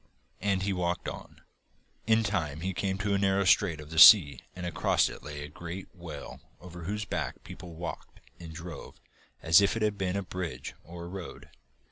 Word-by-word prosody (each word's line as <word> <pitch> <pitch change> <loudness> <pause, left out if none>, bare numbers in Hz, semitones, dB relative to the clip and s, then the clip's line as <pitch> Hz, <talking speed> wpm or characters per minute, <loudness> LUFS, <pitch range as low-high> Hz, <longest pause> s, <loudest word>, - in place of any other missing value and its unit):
And 95 -1 0
he 100 0 0
walked 90 -1 -2
on. - - -8 0.7
In 110 0 +4
time 80 -8 -2
he 95 +2 -2
came 95 +1 -2
to 100 0 -1
a 100 - +2
narrow 95 0 +2
strait 90 -3 +3
of 75 0 -11
the 80 - 0
sea 85 -6 +9 0.2
and 90 - -6
across 90 - +2
it - - -10
lay 75 0 -7
a - - -6
great 85 +5 -8
whale 85 -6 -9 0.2
over 90 -1 -10
whose 105 +3 -3
back - - -4
people 85 -2 -10
walked 85 +1 -7 0.2
and 85 -2 -9
drove 85 +1 -9 0.4
as 80 +6 +6
if 100 +2 +2
it 115 - -1
had 105 -2 0
been 95 -1 -1
a 100 - -2
bridge 90 -8 -6
or 85 +1 -9
a - - -7
road. 90 -1 -9
90 Hz, 195 wpm, -29 LUFS, 85-100 Hz, 0.7 s, sea